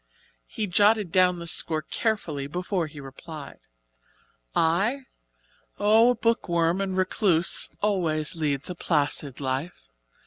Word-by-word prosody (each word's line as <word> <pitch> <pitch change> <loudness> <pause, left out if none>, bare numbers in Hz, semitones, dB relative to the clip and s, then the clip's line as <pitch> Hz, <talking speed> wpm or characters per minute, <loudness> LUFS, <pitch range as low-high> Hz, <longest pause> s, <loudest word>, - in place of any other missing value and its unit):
He 215 - -3
jotted 205 0 +2
down 180 -1 +3
the 170 - -7
score 160 -1 +1
carefully 155 -10 -2
before 180 +2 -2
he 145 -1 -11
replied. 140 +2 -10 1.0
"I? 195 +12 +1 0.8
Oh, 220 +3 +5
a 250 - +2
book 230 -5 0
worm 170 +2 +1
and 190 -1 -2
recluse 185 -3 +3
always 170 -8 0
leads 145 -4 -1
a - - -3
placid 145 -5 -1
life. 135 - -4
170 Hz, 125 wpm, -25 LUFS, 155-200 Hz, 1.0 s, Oh